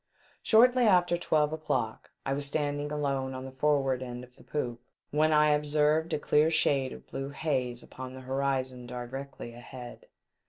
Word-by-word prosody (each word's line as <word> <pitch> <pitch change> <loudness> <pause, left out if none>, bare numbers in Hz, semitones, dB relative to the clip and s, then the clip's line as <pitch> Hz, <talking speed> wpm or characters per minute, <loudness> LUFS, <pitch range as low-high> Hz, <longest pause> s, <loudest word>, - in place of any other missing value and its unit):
Shortly 245 +2 +5
after 180 -4 +4
twelve 155 -3 +1
o'clock, 120 -8 -2 0.2
I 135 - 0
was 140 +1 -2
stand 145 0 -1
ing 145 0 -4
alone 135 -3 -1
on 130 0 -6
the 135 - -7
forward 135 -1 +1
end 125 -1 -6
of 125 0 -15
the - - -17
poop, 120 -5 -3 0.3
when 155 +2 +3
I 150 0 +5
observed 150 +2 +2
a 155 - +1
clear 150 +1 +3
shade 135 -5 +2
of - - -10
blue 135 0 -5
haze 130 -5 -2
upon 130 0 -8
the 130 - -9
horizon 130 -1 -1
directly 125 0 -7
ahead. 120 +1 -10
140 Hz, 170 wpm, -29 LUFS, 130-150 Hz, 0.3 s, Shortly